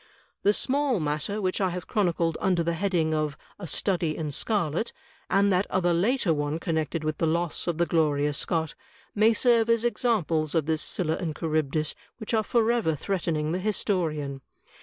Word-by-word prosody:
The 205 - +4
small 270 +1 0
matter 150 +7 -2
which 185 -1 -1
I 190 - +2
have 180 -1 -5
chronicled 170 -5 0
under 180 -3 +2
the 170 +1 0
heading 165 -3 0
of 155 -2 -1 0.2
*A 185 - -6
Study 170 -1 0
in 155 -2 -3
Scarlet,' 180 - -1 0.4
and 195 +1 +3
that 185 +2 +1
other 175 -2 +2
later 200 +1 +2
one 145 +1 -1
connected 160 -1 -2
with 155 0 -2
the 165 - +2
loss 170 +1 -1
of 170 -2 0
the 170 - +2
Gloria 150 -3 +1
Scott, 160 +2 -1 0.4
may 215 +2 +4
serve 230 0 +3
as 230 -1 +3
examples 180 -11 +1
of 160 -3 +2
this 160 0 0
Scylla 160 -3 -1
and 165 -5 -3
Charybdis 155 -2 0 0.2
which 220 0 -5
are 220 - +4
forever 230 -6 +1
threatening 160 -3 -1
the 180 - -1
historian. 160 -9 -1
170 Hz, 175 wpm, -27 LUFS, 155-205 Hz, 0.4 s, The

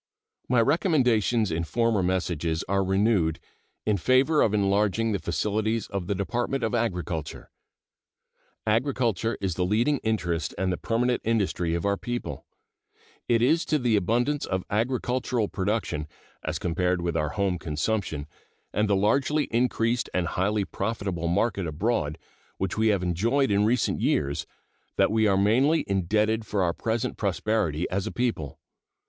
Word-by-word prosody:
My 125 -2 +4
recommendations 120 - +2
in 80 +1 -1
former 115 +3 +1
messages 85 -3 -1
are 100 0 +1
renewed 95 -4 +2 0.5
in 105 -2 +2
favor 130 - +3
of 110 - +3
enlarging 105 +2 +1
the 100 - -1
facilities 110 +3 -1
of 100 -3 -4
the 100 - 0
Department 120 +6 -2
of 115 - -1
Agriculture. 90 -9 -3 1.1
Agriculture 115 -2 0
is 95 -3 -1
the 90 - -1
leading 115 +9 +2
interest 85 -8 -1
and 95 0 0
the - - -3
permanent 125 +2 0
industry 95 -7 0
of 85 - -2
our 100 0 +1
people. 120 +3 -5 0.8
It 115 -1 +3
is 160 +7 +3
to 155 - +1
the 120 -5 +1
abundance 120 +9 +1
of 95 -1 -1
agricultural 120 0 0
production, 95 -6 -2 0.4
as - - -2
compared 90 0 0
with 85 -1 -1
our 75 -2 0
home 95 -1 -1
consumption, 80 -1 -2 0.5
and 105 0 +1
the 100 - +4
largely 135 +9 +2
increased 115 0 +1
and 90 -3 0
highly 100 +2 0
profitable 100 -6 -3
market 95 +1 0
abroad 80 -2 -1 0.4
which 95 -2 -2
we 110 0 +2
have 100 -4 +2
enjoyed 115 +10 +1
in 100 +1 +3
recent 115 +1 +1
years, 70 +1 0 0.5
that - - +3
we 110 0 +3
are 95 -2 +3
mainly 130 +11 +3
indebted 105 +4 +1
for 105 -3 -1
our 85 -1 +1
present 110 +4 -2
prosperity 95 -4 0
as 95 +1 -1
a - - -3
people. 115 - -2
105 Hz, 150 wpm, -26 LUFS, 90-115 Hz, 1.1 s, My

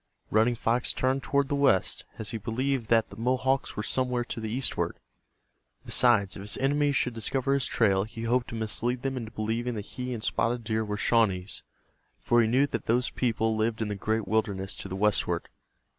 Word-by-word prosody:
Running 115 +3 +3
Fox 120 +1 +1
turned 130 +1 0
toward 140 0 +1
the 145 - -2
west, 135 -9 +2
as 110 - -4
he 115 - -4
believed 120 +2 -1
that 115 -3 +3
the - - -9
Mohawks 130 +4 0
were 105 - -3
somewhere 125 +1 0
to 120 - -5
the 110 -1 -4
eastward. 125 +4 -1 0.9
Besides, 110 -6 +3
if - - -7
his 100 +1 -2
enemies 145 +1 +2
should 125 -1 +1
discover 130 +4 0
his 140 -2 +1
trail 100 -4 +2
he 115 +1 -8
hoped 120 +1 +1
to - - -6
mislead 120 +3 -2
them 135 -1 -1
into 115 -4 -5
believing 115 +2 -2
that 105 -2 -5
he 125 0 -5
and 115 -3 -4
Spotted 120 +1 0
Deer 110 0 0
were 105 -1 -3
Shawnees, 100 -4 +2 0.6
for 120 0 +3
he 115 - +2
knew 130 +5 +4
that - - -4
those 125 +2 +2
people 110 -2 0
lived 110 +1 0
in 110 -2 -1
the 105 - -2
great 110 +1 -1
wilderness 100 -2 -1
to - - -5
the 95 - -5
westward. 105 +2 0
115 Hz, 200 wpm, -28 LUFS, 110-125 Hz, 0.9 s, knew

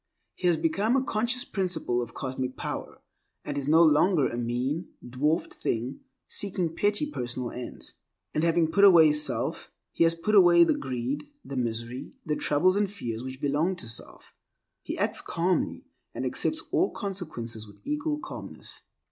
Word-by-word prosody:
He 180 - -1
has 170 -2 +4
become 255 -8 +1
a 265 - +2
conscious 240 +1 -1
principle 180 -10 -1
of 115 -1 -7
Cosmic 130 -1 -4
Power, - - -5 0.4
and - - -3
is 140 -1 -3
no 160 +3 +6
longer 155 0 +4
a - - -5
mean, 125 +8 -2 0.2
dwarfed 150 +7 0
thing, 120 +4 -2 0.3
seeking 180 -5 -1
petty 205 +7 +2
personal 125 - -4
ends. 125 0 -8 0.4
And 155 - 0
having 165 -1 +3
put 200 - +3
away 170 -6 +8
self, 145 -6 -1 0.2
he - - +2
has 165 0 +4
put 170 +6 -2
away 175 -4 +8
the - - +3
greed, 130 +2 -3 0.2
the 140 - -6
misery, 120 +1 -3
the 150 - 0
troubles 180 +7 +3
and 205 -1 +1
fears 120 - -5
which 130 0 -7
belong 150 +7 +1
to 170 - -6
self. 115 - -9 0.5
He - - -5
acts - - 0
calmly, 175 +2 -1 0.3
and - - -3
accepts 320 0 0
all 370 - +3
consequences 155 - -5
with 105 0 -16
equal 300 +1 -1
calmness. - - -9
160 Hz, 165 wpm, -27 LUFS, 125-190 Hz, 0.5 s, away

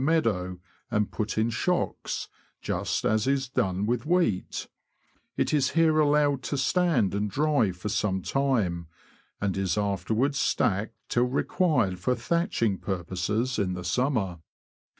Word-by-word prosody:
213 155 -7 +3
meadow 90 -1 -6 0.3
and 105 -3 0
put 110 0 -3
in 110 +2 +2
shocks, 175 +10 -1 0.3
just - - -2
as 110 +2 +2
is 135 -1 +1
done 100 -6 0
with 120 +1 0
wheat; 165 - 0 0.7
it - - +1
is 135 -3 +3
here 160 -1 +4
allowed 145 -2 +3
to 145 - -3
stand 160 - +2
and 105 +1 -1
dry 145 -3 +2
for 90 +3 -7
some 100 -2 0
time, 110 - 0 0.5
and 100 -2 -1
is 95 0 0
afterwards 110 +7 0
stacked 105 +3 +1
till 120 +1 +2
required 130 - +1
for 125 +7 +1
thatch 170 - -1
ing 100 -4 +1
purposes 95 +7 -2
in 95 -3 0
the 90 - -6
summer. 100 - 0
115 Hz, 145 wpm, -27 LUFS, 95-140 Hz, 0.7 s, here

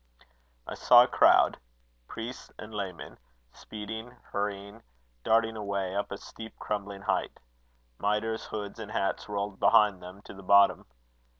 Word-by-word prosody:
"I - - -6
saw - - +7
a - - -1
crowd - - +4 0.5
priests 115 +3 -8
and 105 +1 -10
laymen 95 -4 -6 0.3
speeding, 110 +3 -8
hurrying, 100 +2 -4 0.4
darting 115 0 +2
away, 100 -3 -3
up 100 - -2
a 100 - -4
steep, 110 +2 -11
crumbling 100 -1 -5
height. - - -1 0.6
Mitres, 105 +2 -1
hoods, 105 0 -6
and 110 -2 -7
hats 95 +1 -2
rolled 100 -1 -3
behind 105 -3 +4
them 90 +3 -11
to - - -11
the 100 - -12
bottom. 100 +1 +4
105 Hz, 135 wpm, -29 LUFS, 100-110 Hz, 0.6 s, saw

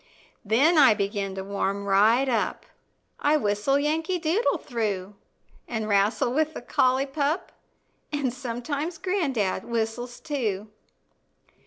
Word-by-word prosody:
Then 275 - +4
I 265 -7 +7
begin 200 -1 -2
to 190 - -4
warm 200 0 -2
right 215 +7 +4
up, 230 -5 -1 0.5
I 295 +1 +3
whistle 210 +3 +1
"Yankee 320 +5 0
Doodle" 350 +7 +1
through, 210 -6 -3 0.5
An' 220 -2 -3
wrastle 210 +3 +2
with 310 +2 0
the - - -5
collie 255 +2 +2
pup 285 +4 -2 0.6
And 285 -5 -1
sometimes 275 +6 -4
gran'dad 285 - -1
whistles 235 +1 -3
too. 215 -8 -3
245 Hz, 120 wpm, -26 LUFS, 210-295 Hz, 0.6 s, I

